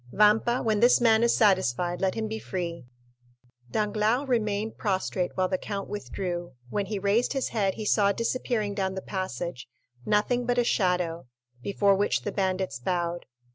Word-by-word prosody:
Vampa, 215 Hz, +4 st, +3 dB
when 215 Hz, -2 st, +1 dB
this 240 Hz, +3 st, +6 dB
man 225 Hz, -2 st, +4 dB
is 235 Hz, 0 st, +3 dB
satisfied, 180 Hz, -, +2 dB
let 190 Hz, -1 st, +1 dB
him 220 Hz, -1 st, -2 dB
be 220 Hz, +1 st, -4 dB
free." 170 Hz, -8 st, -5 dB, 0.8 s
Danglars 215 Hz, -, 0 dB
remained 215 Hz, -3 st, -1 dB
prostrate 190 Hz, -3 st, -1 dB
while 185 Hz, -1 st, +1 dB
the 185 Hz, 0 st, -1 dB
count 200 Hz, -2 st, -4 dB
withdrew; 175 Hz, -5 st, -4 dB, 0.2 s
when 200 Hz, -1 st, -1 dB
he 210 Hz, +1 st, -3 dB
raised 200 Hz, +7 st, +1 dB
his 270 Hz, -2 st, -1 dB
head 200 Hz, -4 st, 0 dB
he 215 Hz, -, -5 dB
saw 200 Hz, -1 st, +3 dB
disappearing 230 Hz, -1 st, -1 dB
down 190 Hz, -1 st, -2 dB
the 190 Hz, -, -4 dB
passage 175 Hz, -, -4 dB, 0.3 s
nothing 235 Hz, -, +1 dB
but 245 Hz, 0 st, +1 dB
a 245 Hz, -, +4 dB
shadow, 180 Hz, -, 0 dB, 0.3 s
before 200 Hz, +6 st, +2 dB
which 200 Hz, +1 st, +1 dB
the 205 Hz, -, -2 dB
bandits 185 Hz, -7 st, -1 dB
bowed. 175 Hz, +4 st, -2 dB
200 Hz, 165 wpm, -27 LUFS, 185-220 Hz, 0.8 s, this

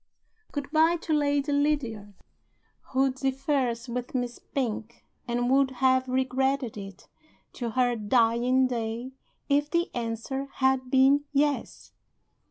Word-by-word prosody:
Good 285 Hz, -1 st, -5 dB
by 320 Hz, +2 st, +4 dB
to 330 Hz, -1 st, -3 dB
Lady 290 Hz, -1 st, +1 dB
Lydiard 260 Hz, -9 st, -1 dB, 0.7 s
who 270 Hz, 0 st, +2 dB
differs 265 Hz, -2 st, -1 dB
with 245 Hz, +2 st, -5 dB
Miss 245 Hz, -1 st, -2 dB
Pink, 235 Hz, -3 st, -4 dB, 0.2 s
and 245 Hz, 0 st, 0 dB
would 270 Hz, 0 st, +4 dB
have 260 Hz, 0 st, +2 dB
regretted 260 Hz, 0 st, 0 dB
it, 195 Hz, -3 st, -9 dB, 0.5 s
to 240 Hz, -2 st, -4 dB
her 245 Hz, +1 st, +1 dB
dying 235 Hz, +3 st, +2 dB
day, 235 Hz, 0 st, -3 dB, 0.4 s
if 290 Hz, +1 st, +2 dB
the 340 Hz, +1 st, 0 dB
answer 240 Hz, +4 st, -3 dB
had 265 Hz, -1 st, +1 dB
been 270 Hz, +2 st, +4 dB
Yes. 285 Hz, 0 st, -1 dB
260 Hz, 120 wpm, -27 LUFS, 240-275 Hz, 0.7 s, by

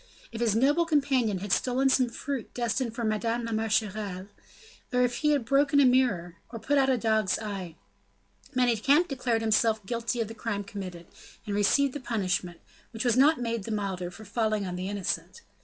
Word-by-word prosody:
If 230 Hz, 0 st, -6 dB
his 225 Hz, -3 st, +2 dB
noble 290 Hz, +8 st, +3 dB
companion 270 Hz, -, +1 dB
had 205 Hz, -1 st, -5 dB
stolen 255 Hz, +4 st, +2 dB
some 260 Hz, -2 st, +3 dB
fruit 270 Hz, 0 st, -5 dB
destined 235 Hz, 0 st, -1 dB
for 235 Hz, -, -3 dB
Madame 230 Hz, +2 st, -1 dB
la 230 Hz, -, -4 dB
Marechale, 210 Hz, -3 st, -1 dB, 0.7 s
if 250 Hz, -1 st, +1 dB
he 300 Hz, -, +1 dB
had 285 Hz, -5 st, +1 dB
broken 285 Hz, +3 st, +3 dB
a 280 Hz, -, +6 dB
mirror, 210 Hz, -10 st, +2 dB
or 230 Hz, -, -7 dB
put 280 Hz, +5 st, +1 dB
out 270 Hz, -1 st, +3 dB
a 260 Hz, -, +3 dB
dog's 220 Hz, -4 st, +1 dB
eye, 195 Hz, -6 st, -6 dB, 0.8 s
Manicamp 255 Hz, +7 st, +3 dB
declared 250 Hz, -5 st, -1 dB
himself 220 Hz, -1 st, +2 dB
guilty 235 Hz, +1 st, -2 dB
of 225 Hz, -, 0 dB
the 225 Hz, -, -8 dB
crime 220 Hz, -2 st, -3 dB
committed, 185 Hz, -4 st, -8 dB, 0.4 s
and 205 Hz, -, -3 dB
received 255 Hz, +7 st, +2 dB
the 290 Hz, -, -4 dB
punishment, 185 Hz, -8 st, -2 dB, 0.3 s
which 225 Hz, +1 st, -5 dB
was 240 Hz, -2 st, +3 dB
not 285 Hz, +4 st, +5 dB
made 230 Hz, -4 st, -2 dB
the 230 Hz, -, -5 dB
milder 195 Hz, -4 st, -3 dB
for 215 Hz, +5 st, -12 dB
falling 215 Hz, 0 st, -1 dB
on 180 Hz, -1 st, -4 dB
the 185 Hz, +2 st, -4 dB
innocent. 205 Hz, -, -3 dB
225 Hz, 185 wpm, -28 LUFS, 205-255 Hz, 0.8 s, a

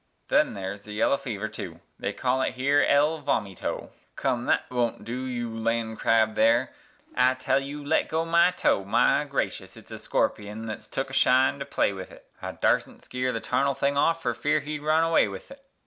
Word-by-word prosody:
Then -, -, +3 dB
there's 100 Hz, +1 st, -5 dB
the 105 Hz, +1 st, -10 dB
yeller 105 Hz, +6 st, +2 dB
fever, 110 Hz, -4 st, -4 dB
tu, 85 Hz, -6 st, -8 dB, 0.2 s
they -, -, -2 dB
call 130 Hz, +1 st, 0 dB
it -, -, -1 dB
here 140 Hz, +3 st, +3 dB
el 150 Hz, +3 st, +3 dB
vomito 105 Hz, -9 st, -2 dB, 0.2 s
(Come, 120 Hz, 0 st, -1 dB
thet -, -, +2 dB
wun't 120 Hz, -4 st, -1 dB
du, 125 Hz, +3 st, -4 dB
you 120 Hz, -2 st, -3 dB
landcrab 115 Hz, -1 st, +1 dB
there, 120 Hz, +4 st, +3 dB, 0.4 s
I 130 Hz, +1 st, +4 dB
tell 130 Hz, +1 st, +1 dB
ye 140 Hz, +1 st, -6 dB
to 145 Hz, -1 st, -8 dB
le' -, -, +2 dB
go 160 Hz, +1 st, -1 dB
my 170 Hz, +1 st, +4 dB
toe! 180 Hz, -, +1 dB
My 100 Hz, -, +2 dB
gracious! -, -, -3 dB
it's -, -, -15 dB
a -, -, -7 dB
scorpion 105 Hz, +2 st, -2 dB
thet's 110 Hz, -1 st, -7 dB
took 135 Hz, 0 st, -4 dB
a -, -, -10 dB
shine 130 Hz, +1 st, +3 dB
to 140 Hz, -, -4 dB
play 140 Hz, -7 st, 0 dB
with 95 Hz, -1 st, -8 dB
't, -, -, -14 dB, 0.2 s
I -, -, -5 dB
darsn't -, -, 0 dB
skeer 125 Hz, 0 st, -2 dB
the 115 Hz, -, -3 dB
tarnel 140 Hz, 0 st, 0 dB
thing 140 Hz, +1 st, 0 dB, 0.2 s
fer 165 Hz, -, -2 dB
fear 150 Hz, +1 st, 0 dB
he'd 150 Hz, 0 st, -5 dB
run 155 Hz, +2 st, +3 dB
away 165 Hz, -8 st, +3 dB
with 100 Hz, -1 st, -9 dB
't). 275 Hz, -, -12 dB
125 Hz, 200 wpm, -26 LUFS, 110-140 Hz, 0.4 s, I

